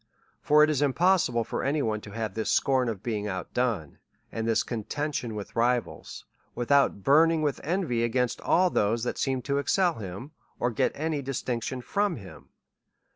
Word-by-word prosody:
For 150 +1 +5
it 155 - +4
is 145 -2 0
impossible 145 -4 +2
for - - -4
any 145 +1 0
one 110 -1 -1
to 105 - -11
have 110 -1 -4
this 110 +1 -2
scorn 130 -3 +2
of 105 -4 -5
being 105 -3 -2
out 95 -3 -5
done^ 115 - -1 0.3
and 115 0 -3
this 115 - +2
conten 145 +6 -3
tion 115 -4 -3
with 105 -1 -7
rivals, 120 0 -1 0.3
without 125 -4 +2
burning 160 +3 +4
with 145 -2 -1
envy 160 -9 0
against 125 +1 0
ail 180 0 +3
those 110 +3 +1
that 125 - -3
seem 130 -2 -1
to 140 +2 0
excel 175 0 +1
him, 100 - -7 0.3
or 120 - +1
get 110 - +1
any 155 -1 -2
distinction 130 -1 -3
from 200 - 0
him. 95 - -12
125 Hz, 180 wpm, -27 LUFS, 110-145 Hz, 0.3 s, For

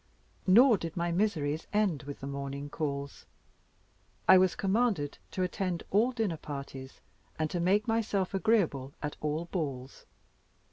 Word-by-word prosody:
Nor 225 +3 +7
did 165 +1 -6
my 170 0 0
miseries 165 -6 0
end 205 -8 +1
with 145 - -7
the - - -5
morning 140 +1 -5
calls. 140 -2 -4 1.0
I - - +9
was 185 -1 +4
commanded 195 -7 0
to 185 - -2
attend 180 -1 -2
all 225 +6 +3
dinner 220 -9 -1
parties, 140 -3 -8 0.4
and 155 -1 -1
to 175 - -1
make 195 +5 +2
myself 215 -4 0
agreeable 190 - +1
at 150 - -3
all 155 +2 -1
balls. 140 -7 -5
170 Hz, 140 wpm, -30 LUFS, 145-200 Hz, 1.0 s, I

